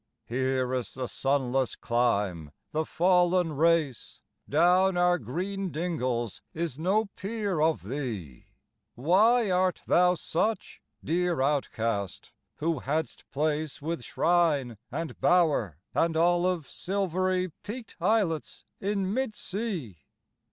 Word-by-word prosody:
Here 130 +1 0
is 125 -2 -3
the 130 -1 -3
sunless 135 -2 0
clime, 100 -9 0 0.2
the 155 +1 0
fallen 180 -2 +2
race; 155 -5 +1 0.3
Down 180 +4 +4
our 175 0 +3
green 195 +2 -3
dingles 130 - -2
is 160 -4 -3
no 195 +6 +2
peer 205 -4 -2
of 160 - +2
thee: 105 - -5 0.5
Why 205 - +4
art 185 0 +1
thou 180 +1 +4
such, 210 +6 -2 0.2
dear 175 +1 0
outcast, 115 - -1 0.2
who 160 -1 -1
hadst 155 +5 -3
place 150 +1 -1
With 165 +3 -3
shrine, 150 -10 +1
and 165 0 -5
bower, 150 - +3 0.2
and 165 -1 +1
olive 175 -1 +2
silvery 185 -1 -1
Peaked 225 +2 -7
islets 185 -5 0
in 195 -1 -1
mid 260 -3 -1
sea? 180 - -4
165 Hz, 110 wpm, -28 LUFS, 135-185 Hz, 0.5 s, Down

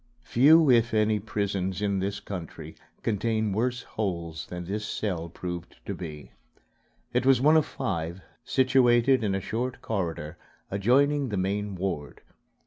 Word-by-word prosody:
Few, 155 +6 +6
if 115 -1 +3
any, 110 0 +3
prisons 100 -3 -2
in 100 -2 0
this 100 +1 -2
country 90 -5 -7 0.3
contain 110 0 0
worse 125 +4 -1
holes 85 -6 -4
than 90 -1 -6
this 105 +4 -3
cell 90 -6 -3
proved 85 0 -6
to - - -3
be. 75 -5 -8 0.8
It 125 +1 +2
was 135 -1 +5
one 150 +5 +5
of 155 -2 +4
five, 90 - -3 0.2
situated 130 -1 +4
in 100 -2 0
a - - 0
short 120 +6 -3
corridor 85 -7 -3 0.3
adjoining 135 +7 +2
the 105 - -2
main 100 +2 -1
ward. 90 -6 -4
105 Hz, 140 wpm, -27 LUFS, 90-125 Hz, 0.8 s, Few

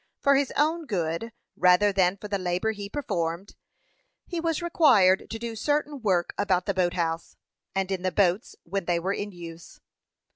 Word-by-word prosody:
For 280 0 +4
his 275 -1 +1
own 315 +2 +1
good, 175 +2 -2 0.2
rather 180 +3 +4
than 190 0 +2
for 210 - -8
the 200 -1 -2
labor 180 +4 0
he 205 -2 -7
performed, 185 - -3 0.7
he 345 - -4
was 330 -1 0
required 255 - +4
to 225 - -4
do 230 0 -5
certain 290 +4 -1
work 185 -5 +1
about 190 -3 +1
the 200 - 0
boat 180 -2 +1
house, 165 -2 -2 0.4
and 195 0 -1
in 190 -2 -1
the 185 0 0
boats 190 +1 +1
when 195 +1 -3
they 175 -1 +1
were 190 +3 -1
in 205 0 -4
use. 170 -2 -11
195 Hz, 180 wpm, -26 LUFS, 180-230 Hz, 0.7 s, For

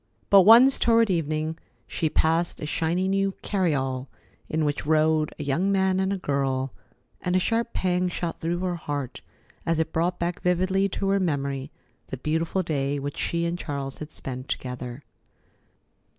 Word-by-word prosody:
But 200 -1 +9
once, 235 +7 +7
toward 230 -2 +4
evening, 160 -1 -1 0.3
she 160 - -1
passed 165 +3 +1
a - - -4
shiny 165 +4 0
new 195 0 +1
carryall 135 -9 0 0.4
in 155 0 0
which 145 -1 -1
rode 155 0 +3
a 150 - -4
young 165 +8 +1
man 190 -1 +2
and 190 0 +1
a 200 - 0
girl, 135 -5 -1 0.5
and 180 0 0
a - - +5
sharp 230 +4 0
pang 180 0 +1
shot 170 -1 -4
through 170 +2 -1
her 180 -2 -1
heart 145 -5 -4 0.4
as 165 -1 0
it 160 0 -1
brought 175 +2 0
back 170 0 -2
vividly 185 +2 +2
to 195 +1 -2
her 195 0 +3
memory 140 -5 -1 0.4
the 135 - -5
beautiful 160 +7 -1
day 145 -3 -1
which 140 0 -4
she 170 0 -1
and 170 +1 -2
Charles 140 -4 -4
had 155 - -6
spent 130 -3 -6
together. 125 +1 -5
165 Hz, 165 wpm, -25 LUFS, 145-185 Hz, 0.5 s, But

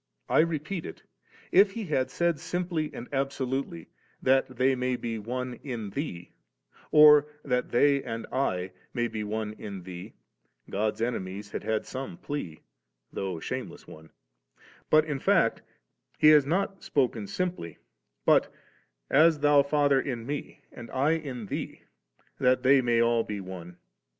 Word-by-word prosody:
I - - +3
repeat 165 +2 -1
it; - - -10 0.5
if 195 +1 +5
He 225 -1 -4
had 140 -6 0
said 170 -3 0
simply 170 -2 -2
and 120 - -8
absolutely^ 135 - -2 0.4
'that 130 -1 +2
they 130 +2 +3
may 125 0 -1
be 115 -2 -4
one 125 +3 -4
in 115 -7 -5
Thee,* 90 - -5 0.6
or 150 -1 +8 0.2
'that 125 -2 -1
they 140 +3 +3
and 115 -1 -5
I 95 -9 -1 0.2
may 120 -1 +1
be 110 -2 -4
one 105 0 -3
in 100 -3 -7
Thee/ 90 -1 -9 0.6
God's 110 +2 -1
enemies 100 -3 -4
had - - -5
had 110 0 -1
some 135 +7 -6
plea, 145 - -6 0.5
though 95 -3 -3
a - - -10
shameless - - -5
one; 80 0 -13 0.8
but 155 0 +5
in 150 -3 -3
fact - - +2 0.6
He 155 - +6
has 150 -3 +6
not 195 +4 -1
spoken 125 - 0
simply, 175 - -3 0.5
but, - - +4 0.3
' - - -49
As 160 -1 +5
Thou, 145 -1 +6
Father, 140 -1 +2
in 120 -5 -4
Me, 145 +2 -6
and 120 -2 -10
I 140 +4 +1
in 140 -8 -3
Thee, - - -5 0.6
that 125 0 +3
they 135 +1 +6
may 120 -1 +1
be - - +6
all 115 -1 +2
one. 95 -4 -7
130 Hz, 155 wpm, -28 LUFS, 110-150 Hz, 0.8 s, or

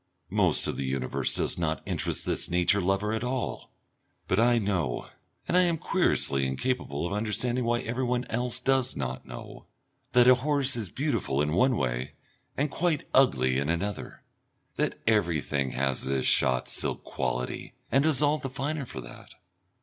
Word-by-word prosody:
Most - - +2
of - - -2
the 70 - -2
universe 65 -1 -1
does - - 0
not 80 -3 -1
interest - - -2
this - - -1
nature 90 +3 +3
lover 95 +3 0
at 110 - -2
all. 125 0 -3 0.6
But 95 - +1
I 120 +1 +4
know, 95 - -1 0.4
and - - 0
I 180 - +6
am 170 -2 +2
querulously 70 - +1
incapable 75 - -2
of 90 - -3
understanding 120 +4 -1
why 120 0 +1
everyone 125 +1 -1
else 120 +1 0
does 130 0 +1
not 65 -1 -4
know, - - -10 0.5
that 125 0 +6
a 130 - +9
horse 140 +1 +1
is 110 -6 -4
beautiful 115 - -1
in 75 +1 +1
one 125 +8 +3
way 65 -2 -2 0.4
and 145 +1 0
quite 165 -4 0
ugly 65 - +4
in 70 +2 -2
another, 95 +5 -3 0.5
that - - -1
everything 75 - +1
has 65 0 0
this 65 0 -1
shot 65 -1 +2
silk - - -1
quality, 60 0 -3 0.2
and 135 +3 +4
is 150 -2 +3
all 150 +1 +2
the 135 - -4
finer 140 +1 -3
for 65 - -7
that. - - -13
105 Hz, 165 wpm, -28 LUFS, -, 0.6 s, a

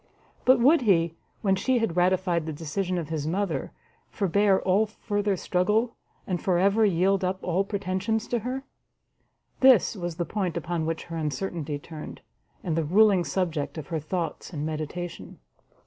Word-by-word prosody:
But 260 0 +6
would 275 +6 +5
he, 170 -7 +3 0.3
when 195 -2 +3
she 255 +7 +1
had 225 -8 0
ratified 180 -2 +2
the - - -2
decision 170 +5 -2
of 165 -3 -4
his 155 -2 -2
mother, 175 -4 -1 0.4
forbear 200 0 +2
all 200 +4 +2
further 205 -2 -1
struggle, 210 +7 +1 0.3
and 180 -3 -2
for 185 -2 +2
ever 200 +4 +3
yield 195 0 +2
up 185 +1 0
all 180 +2 +1
pretensions 200 +2 -2
to 240 - +1
her? 255 +4 -4 1.0
this 255 -5 +6
was 175 -4 -4
the 175 0 -2
point 185 -1 -2
upon 170 -2 -2
which 165 0 -2
her 165 -1 -6
uncertainty 155 0 -3
turned, 155 +1 -9 0.4
and 165 -3 -1
the 165 - +1
ruling 195 +3 +4
subject 170 -5 -2
of 155 - -7
her 160 - -1
thoughts 165 +4 -4
and 150 -3 -4
meditation. 155 - -5
185 Hz, 165 wpm, -26 LUFS, 165-205 Hz, 1.0 s, But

